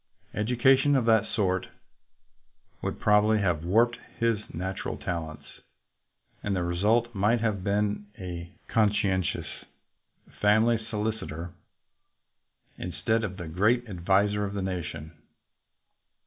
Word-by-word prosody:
Education 130 +6 +3
of 130 -4 +2
that 110 -2 +4
sort 95 -4 0 1.1
would - - -3
probably 105 +1 +4
have 90 -6 0
warped 115 +7 +3 0.2
his 115 -2 +1
nat 95 +3 -4
ural - - -4
talents, 80 -3 -5 1.0
and 100 -1 -1
the 90 - 0
result 105 +7 +1
might 105 +4 +2
have 105 -5 -1
been 105 +1 0
a 90 -3 -6 0.2
conscientious 100 -4 0 0.8
family 110 +2 +4
solicitor 105 -6 -3 1.3
instead 110 +5 -1
of 95 -3 -4
the 85 -3 -6
great 110 +9 +2
adviser 100 +2 +1
of 100 0 -3
a 100 - -1
nation. 85 -4 -4
105 Hz, 110 wpm, -27 LUFS, 90-110 Hz, 1.3 s, that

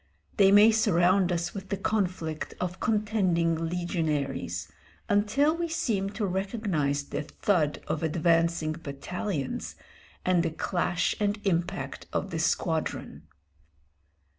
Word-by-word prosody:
They 195 -1 +6
may 205 +2 +8
surround 185 -3 +3
us 170 0 -1
with 195 -1 -7
the 200 - -1
conflict 185 -6 -2
of 180 0 -3
contending 185 -7 +1
legionaries, 145 - -2 0.4
until 215 +10 +3
we 340 0 -2
seem 215 - 0
to 210 +1 -1
recognise 185 -7 -1
the - - -4
thud 155 0 0
of 155 - -2
advancing 165 0 +2
battalions 155 +1 -4 0.5
and 180 -2 +3
the 165 - 0
clash 175 +1 0
and 205 0 0
impact 175 -2 -2
of - - -2
the - - -2
squadron. - - -1
180 Hz, 115 wpm, -28 LUFS, 160-205 Hz, 0.5 s, may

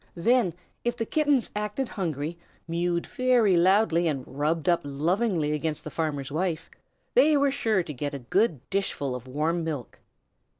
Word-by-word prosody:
Then 185 0 +2 0.3
if 240 0 -1
the 225 - -1
Kittens 290 -3 +1
acted 210 +5 -2
hungry, 165 - -3 0.3
mewed 170 +1 -1
very 250 -6 +3
loudly, 175 -1 +4
and 140 -5 -1
rubbed 150 +3 -1
up 175 -1 +3
lovingly 160 +3 0
against 150 0 -2
the 155 - -7
farmer's 145 -4 -2
wife 165 0 -2 0.4
they 310 -11 +5
were 280 0 +3
sure 220 -8 +1
to 155 - -6
get 145 +2 -4
a 130 -3 -8
good, 175 - +1
dishful 190 -9 -1
of 125 0 -7
warm 155 +6 -1
milk. 150 -8 -5
170 Hz, 160 wpm, -27 LUFS, 150-210 Hz, 0.4 s, they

